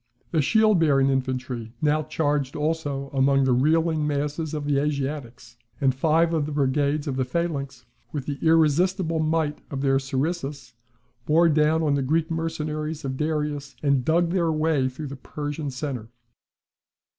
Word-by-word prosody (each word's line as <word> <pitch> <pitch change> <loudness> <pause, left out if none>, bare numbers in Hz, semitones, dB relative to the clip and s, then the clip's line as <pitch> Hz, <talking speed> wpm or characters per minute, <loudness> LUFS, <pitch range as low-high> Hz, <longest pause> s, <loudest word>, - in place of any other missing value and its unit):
The 160 - +2
shield 215 +5 +4
bearing 135 -4 +3
infantry 130 -3 -2
now 150 0 +2
charged 145 -3 -1
also 150 -3 -2
among 135 0 +3
the 130 - +2
reeling 155 +3 +2
masses 150 +2 -2
of 150 -1 -4
the 145 -1 +2
Asiatics; 135 -5 -4 0.2
and 135 -2 +3
five 160 +5 +2
of 155 -3 0
the - - -5
brigades 145 +1 +1
of 135 -2 -2
the 130 - +2
phalanx, 140 -3 -3 0.3
with 145 -4 -4
the 140 -2 -4
irresistible 165 +2 +2
might 155 -1 0
of 135 -2 -4
their 135 -1 +3
sarissas, 140 +1 -3 0.5
bore 165 +2 +5
down 155 0 +2
the 140 - +1
Greek 160 +5 0
mercenaries 155 -2 -3
of 130 -1 -2
Darius, 150 -1 -2
and 140 -3 +2
dug 170 +4 +2
their 170 -3 +1
way 155 -4 +1
through 135 +4 -7
the 140 0 -6
Persian 145 +2 -5
centre. 130 -4 -5
150 Hz, 155 wpm, -25 LUFS, 135-160 Hz, 0.5 s, bore